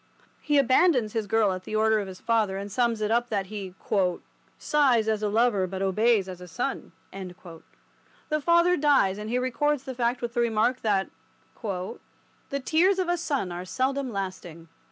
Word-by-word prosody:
He 295 Hz, -1 st, +1 dB
abandons 260 Hz, -, +3 dB
his 220 Hz, -2 st, -2 dB
girl 220 Hz, -1 st, +2 dB
at 185 Hz, 0 st, -5 dB
the 215 Hz, -, -5 dB
order 220 Hz, 0 st, +3 dB
of 200 Hz, -, -4 dB
his 185 Hz, -1 st, -9 dB
father, 220 Hz, -4 st, +1 dB
and 200 Hz, +1 st, -6 dB
sums 235 Hz, -1 st, 0 dB
it 210 Hz, 0 st, 0 dB
up 240 Hz, +1 st, +1 dB
that 200 Hz, -3 st, -1 dB
he 190 Hz, -3 st, -6 dB, 0.8 s
"sighs 260 Hz, -7 st, +2 dB
as 215 Hz, -1 st, 0 dB
a 210 Hz, -, 0 dB
lover 210 Hz, -3 st, +2 dB
but 190 Hz, +1 st, -4 dB
obeys 210 Hz, +1 st, +2 dB
as 180 Hz, -1 st, -8 dB
a 180 Hz, -, -9 dB
son." 245 Hz, +11 st, -4 dB, 0.2 s
The 185 Hz, -, -9 dB
father 340 Hz, +2 st, +4 dB
dies, 275 Hz, -10 st, +3 dB
and 210 Hz, +1 st, -6 dB
he 245 Hz, -, 0 dB
records 265 Hz, +3 st, 0 dB
the 260 Hz, -, -6 dB
fact 245 Hz, 0 st, -1 dB
with 235 Hz, -1 st, -3 dB
the 240 Hz, -, +1 dB
remark 235 Hz, +2 st, +1 dB
that 200 Hz, -3 st, 0 dB, 0.5 s
"the 200 Hz, +6 st, -7 dB
tears 365 Hz, +5 st, +3 dB
of 370 Hz, -2 st, -1 dB
a 350 Hz, -, +2 dB
son 280 Hz, -, -2 dB
are 175 Hz, +1 st, -5 dB
seldom 260 Hz, +6 st, -1 dB
lasting." 185 Hz, -5 st, -6 dB
220 Hz, 180 wpm, -26 LUFS, 195-260 Hz, 0.8 s, father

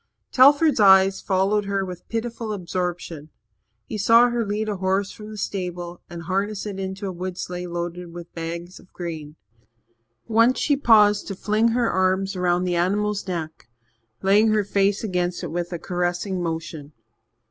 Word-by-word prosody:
Telford's 285 Hz, +2 st, +5 dB
eyes 190 Hz, -1 st, +6 dB
followed 200 Hz, +2 st, +1 dB
her 195 Hz, -1 st, -1 dB
with 180 Hz, -2 st, -9 dB
pitiful 230 Hz, -1 st, -3 dB
absorption. 175 Hz, -4 st, -4 dB, 0.6 s
He 215 Hz, -, -5 dB
saw 230 Hz, +4 st, +6 dB
her 240 Hz, -1 st, 0 dB
lead 210 Hz, +1 st, -2 dB
a 210 Hz, -2 st, -2 dB
horse 190 Hz, +1 st, 0 dB
from 215 Hz, 0 st, -10 dB
the 215 Hz, -, -8 dB
stable 175 Hz, -3 st, -4 dB
and 170 Hz, -1 st, -8 dB
harness 195 Hz, +4 st, -2 dB
it 200 Hz, -2 st, -5 dB
into 190 Hz, +1 st, -5 dB
a 190 Hz, -, -3 dB
wood 185 Hz, 0 st, -5 dB
sleigh 180 Hz, -1 st, -5 dB
loaded 175 Hz, 0 st, -5 dB
with 170 Hz, 0 st, -10 dB
bags 170 Hz, +2 st, -6 dB
of 185 Hz, -, -20 dB
grain. 160 Hz, -4 st, -6 dB, 0.9 s
Once 230 Hz, +3 st, +4 dB
she 290 Hz, -, +2 dB
paused 210 Hz, -6 st, +4 dB
to 195 Hz, -, -4 dB
fling 215 Hz, +4 st, +1 dB
her 235 Hz, +1 st, +1 dB
arms 190 Hz, +1 st, +1 dB
about 180 Hz, 0 st, +1 dB
the 180 Hz, -1 st, 0 dB
animal's 205 Hz, +4 st, 0 dB
neck, 160 Hz, -8 st, -5 dB, 0.5 s
laying 205 Hz, +3 st, +4 dB
her 215 Hz, -1 st, +2 dB
face 200 Hz, +1 st, +1 dB
against 180 Hz, -3 st, -2 dB
it 170 Hz, -, -4 dB
with 175 Hz, +1 st, -3 dB
a 175 Hz, -, -3 dB
caressing 180 Hz, +2 st, -2 dB
motion. 160 Hz, -3 st, -5 dB
190 Hz, 165 wpm, -23 LUFS, 175-210 Hz, 0.9 s, eyes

